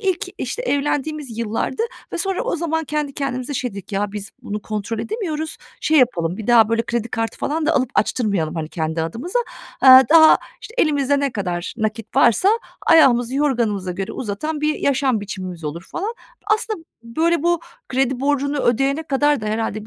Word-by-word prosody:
ilk, 380 -4 0
işte, - - -3
evlendiğimiz 290 - -2
yıllardı 230 - -2 0.3
ve - - -3
sonra 385 +5 -1
o 485 -8 -1
zaman 320 -1 -1
kendi 300 -1 -2
kendimize 270 0 -3
şey 250 -1 -2
dedik: 200 +1 -10
“Ya, 200 +1 -1
biz 210 0 -6
bunu 210 -3 -5
kontrol 215 +1 -4
edemiyoruz, 320 - -3 0.2
şey 315 -1 +3
yapalım, 180 -8 +2
bir 220 - -7
daha 230 -2 +6
böyle 230 0 +1
kredi 235 0 -2
kartı 225 +1 -3
falan 310 +1 -1
da 325 - +3
alıp 260 -2 +1
açtırmayalım, 195 -9 0
hani, 160 -1 -3
kendi 160 -1 -2
adımıza. 240 - -2 0.4
Eee, 260 0 +10
daha, 315 0 +8 0.2
işte, 450 - -11
elimizde 285 -2 +2
ne 280 -3 0
kadar 180 -4 -3
nakit 215 -1 -3
varsa, 370 - +5 0.4
ayağımızı 260 -6 +5
yorganımıza 230 -10 0
göre 190 +1 -4
uzatan 275 +8 -4
bir 305 0 +1
yaşam 265 -5 +1
biçimimiz 185 -5 -6
olur.” 160 +4 -4
falan. 420 +6 -3 0.3
Aslında, 430 -5 0 0.2
böyle, 320 +7 0
bu 345 -1 +2 0.3
kredi 265 -1 0
borcunu 285 0 0
ödeyene 270 +6 +1
kadar 290 -2 +1
da 215 - -5
herhâlde 215 0 -2
260 Hz, 170 wpm, -21 LUFS, 215-305 Hz, 0.4 s, Eee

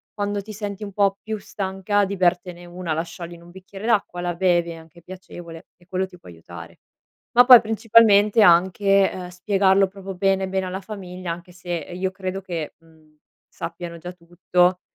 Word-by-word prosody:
quando 205 -1 -2
ti 215 +2 -10
senti 205 0 -6
un 200 -2 -7
pò 200 -1 +2
più 220 0 -4
stanca 195 +1 -1
di 200 - -4
bertene 175 -1 0
una, 175 -2 -4
la 160 - -1
sciogli 170 0 -9
in 170 - -13
un 175 - -15
bicchiere 190 +3 -11
d'acqua, 200 -6 0
la 175 0 -2
bevi, 175 -2 +1
è - - -8
anche 165 +1 -16
piacevole, 175 -2 -11
e 175 - -24
quello 185 0 -2
ti 180 - -16
può 170 - -15
aiutare. 85 0 -12 0.6
Ma 245 - +8
poi, 250 -3 +10
principalmente, 220 -1 +4
anche, 190 +2 +4
ehm, 180 -1 -7
spiegarlo 190 +1 +2
proprio 195 0 -9
bene, 190 +1 +1
bene 190 0 -2
alla 185 +1 -5
famiglia, 185 -4 -7
anche 175 +1 -10
se 180 0 -11
io 175 +3 -3
credo 190 0 -5
che, 170 -5 -5
mhmm, 160 -1 -25 0.3
sappiano 170 0 -7
già 180 +2 -8
tutto, 180 +1 0
185 Hz, 185 wpm, -22 LUFS, 175-195 Hz, 0.6 s, poi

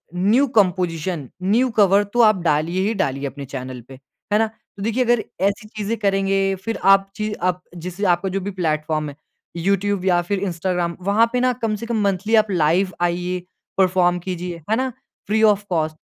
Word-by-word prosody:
New 215 +10 +3
composition, 175 - +1
new 230 +7 +3
cover 200 0 +5
तो 240 - +4
आप 215 -3 +5
डालिए 165 +3 +1
ही 225 - 0
डालिए 140 -3 -2
अपने 140 +1 -7
चैनल 130 -2 -7
पे। 135 - -12 0.4
है 210 - +4
ना? 225 - +3
तो 215 -2 -13
देखिए 230 +4 +1
अगर 240 -2 +2 0.2
ऐसी 200 +2 0
चीज़ें 215 +1 -3
करेंगे, 195 -1 +1
फिर 225 +5 -4
आप 195 0 +5
ची 215 -1 -2
आप 180 -2 -1
जैसे 180 +4 -4
आपका 175 +3 -2
जो 195 +1 -2
भी 200 +2 -4
प्लेटफॉर्म 155 -1 -1
है 140 - -10 0.4
यूट्यूब 195 +2 0
या 175 -2 +3
फिर 195 +3 -2
इंस्टाग्राम, 175 -2 -2
वहाँ 205 +5 +3
पे 250 - +2
ना 255 0 +3
कम 220 -1 0
से 230 - -6
कम 230 -2 -1
मंथली 200 +3 +1
आप 215 -1 +3
लाइव 180 +3 +2
आइये, 175 +1 -1 0.3
परफॉर्म 180 -2 +3
कीजिए। 180 -1 -5
है 220 - +3
ना? 260 +2 0 0.4
Free 215 +2 +1
of 210 -2 +4
cost. 160 -3 0
190 Hz, 190 wpm, -21 LUFS, 175-210 Hz, 0.4 s, cover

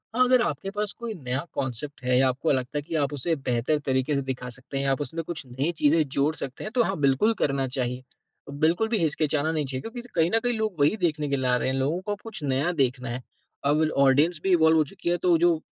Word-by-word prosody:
हाँ, 255 - +5
अगर 255 0 +4
आपके 175 - -2
पास 210 0 -2
कोई 235 -1 -4
नया 130 -8 -3
कॉन्सेप्ट 130 +1 -4
है 125 0 +2
या 130 +1 +4
आपको 135 +5 0
लगता 130 +1 -1
है - - 0
कि 165 +2 -5
आप 145 -3 +1
उसे 160 +4 -1
बेहतर 130 +2 0
तरीके 130 +2 +1
से 140 - +1
दिखा 125 -1 -4
सकते 130 +3 -7
हैं, 140 - -1
आप 135 +2 0
उसमें 165 +3 -4
कुछ 160 -3 -5
नई 135 +7 -1
चीज़ें 155 +2 +4
जोड़ 140 +3 +1
सकते 135 -1 -5
हैं, 215 - -5
तो 245 - +5
हाँ 195 -4 -1
बिल्कुल 140 +11 +3
करना 135 -1 +1
चाहिए। 125 -1 -3 0.5
बिल्कुल 160 +9 +1
भी 225 - +1
हिचकिचाना 155 -2 0
नहीं 155 -2 -1
चाहिए। 130 -1 -4
क्योंकि 240 - -6
कहीं 165 -1 +3
न - - +4
कहीं 245 0 +1
लोग 215 -7 -2
वही 145 +8 +4
देखने 155 -5 0
के 140 - +1
लिए 130 -1 0
आ 125 - +4
रहे 130 - -1
हैं, 130 - -1
लोगों 140 +6 0
को 205 -1 -1
कुछ 225 -7 -8
नया 140 +4 +1
देखना 125 -1 0
है। 120 +2 -4 0.4
अब 150 +2 +3 0.2
ऑडियंस 150 +5 +3
भी 195 - +1
इवॉल्व 160 -2 +5
हो 155 - +5
चुकी 170 +4 -5
है 175 - +2
तो 170 -2 +5
जो 170 0 +3
150 Hz, 250 wpm, -26 LUFS, 130-175 Hz, 0.5 s, हाँ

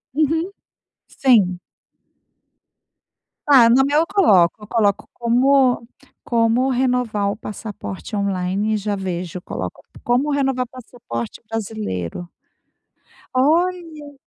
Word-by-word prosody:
Uhum. 320 +5 0 0.6
Sim. 205 -9 +2 1.9
Ah, 265 -5 +7
no 255 +3 +5
meu 290 +2 +2
eu 330 - +1
coloco 200 - +4
eu - - -10
coloco 205 -3 0
como 250 +1 +2 0.4
como 235 +2 +2
renovar 245 -5 0
o 200 - -2
passaporte 210 0 -7
online 200 +1 -1
e - - 0
já 205 0 -2
vejo. 180 -2 -4
Eu - - -8
coloco - - -6 0.2
como 255 +5 +1
renovar 270 -2 0
o - - -23
passaporte 225 - -7
brasileiro. 200 - -4 1.1
Olha! 315 +1 0
235 Hz, 110 wpm, -20 LUFS, 200-270 Hz, 1.9 s, Ah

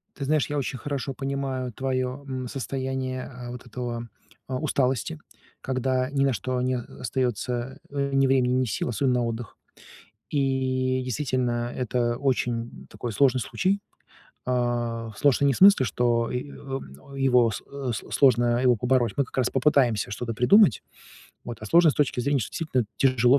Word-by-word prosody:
Ты 140 - -4
знаешь, 150 0 +1
я 145 - -1
очень 130 -1 -3
хорошо 140 -1 -4
понимаю 135 -2 -3
твоё, 130 +2 -2
м, 130 -2 -4
состояние 130 -1 -3
а 125 -2 -8
вот 125 0 -9
этого, 120 0 -5 0.4
а, 130 -1 -2
усталости, 130 - 0 0.4
когда 130 0 -1
ни 140 -1 +1
на 135 - +3
что 125 +4 -2
не 130 0 0
остаётся, 125 +1 -3
а, 140 -1 -1
ни 135 0 +4
времени, 130 -2 +3
ни 130 0 +2
сил, 110 +2 -2
особенно 125 +1 +1
на - - 0
отдых. 115 -1 -5 0.7
И, 130 -2 0
действительно, 125 -2 -1
это 120 -1 0
очень 120 -3 -2
такой 120 - -5
сложный 130 +2 +3
случай. 195 - 0 0.7
А, 120 -2 -1
сложный 140 0 +3
не 135 - +3
в - - -4
смысле, 195 -9 +7
что 120 +2 +1
и 125 +3 -4
ом 135 - -8
его 125 -4 +4
с - - -5 0.3
с - - -6
сложно 120 -2 +4
его 125 -2 +4
побороть, 125 -1 +1
мы 140 - +3
как - - -13
раз 125 -2 +2
попытаемся 130 -8 +2
что-то 115 +1 -3
придумать. 135 - +5 0.6
Вот. 120 -2 -6
А 110 - -7
сложно 170 +4 +6
с - - -5
точки 140 -4 +1
зрения, 140 +1 +1
что - - -4
действительно 130 -8 -1
тяжело 130 0 +4
130 Hz, 165 wpm, -26 LUFS, 120-135 Hz, 0.7 s, смысле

